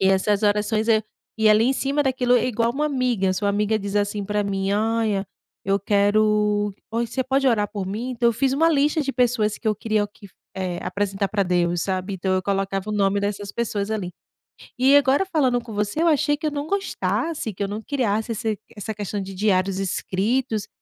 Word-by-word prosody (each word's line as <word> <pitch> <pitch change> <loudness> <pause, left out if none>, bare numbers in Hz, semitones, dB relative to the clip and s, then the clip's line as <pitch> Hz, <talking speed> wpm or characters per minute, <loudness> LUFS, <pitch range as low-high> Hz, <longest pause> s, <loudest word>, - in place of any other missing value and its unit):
E 190 - +3
essas 200 +2 +2
orações, 210 +2 +1
eh, 220 -1 +4 0.4
e 220 -1 +4
ali 215 +2 +5
em 265 - +3
cima 280 +2 0
daquilo 250 -2 +2
é 240 - +1
igual 230 -1 +1
uma 300 +3 0
amiga, 245 -9 0
sua 200 +2 -1
amiga 210 +2 +1
diz, 200 0 -4
assim, 205 0 0
para 210 +1 0
mim, 195 0 -1
"Olha, 215 -2 0 0.4
eu 195 +1 +2
quero 210 0 +2 0.2
oi 235 +1 -1
você 260 +3 -2
pode 270 +1 +1
orar 210 -4 +2
por 200 -3 -4
mim?". 225 +6 -4
Então, 240 -1 +2
eu - - +2
fiz 265 +4 +1
uma 320 +4 +3
lista 300 +1 +2
de 275 -1 -2
pessoas, 230 -5 +1
que 220 - -2
eu 215 - +2
queria 215 -1 0
que, 205 0 -16 0.3
eh, 180 -2 -3
apresentar 200 -1 -1
para 205 -2 0
Deus 175 -2 +1
sabe. 190 0 -2
Então, 190 +1 -1
eu 185 - 0
colocava 195 +1 -2
o - - -2
nome 200 -1 +1
dessas 205 0 -3
pessoas 210 -3 -2
ali. 195 -5 -3 0.7
E 270 +2 +5
agora 285 +5 +4
falando 265 -9 +1
com 230 -2 -10
você, 210 +8 -1
eu 340 - +3
achei 295 -1 +2
que 310 +1 -2
eu - - -1
não 290 0 -4
gostasse, 335 - -2
que 200 - -4
eu - - -1
não 210 +2 -5
criasse 225 -4 -1
esse 220 -1 -2 0.2
essa 215 +1 -5
questão 205 -1 -4
de 195 0 -7
diários 190 -1 +1
escritos, 215 +4 -1
210 Hz, 210 wpm, -23 LUFS, 200-250 Hz, 0.7 s, ali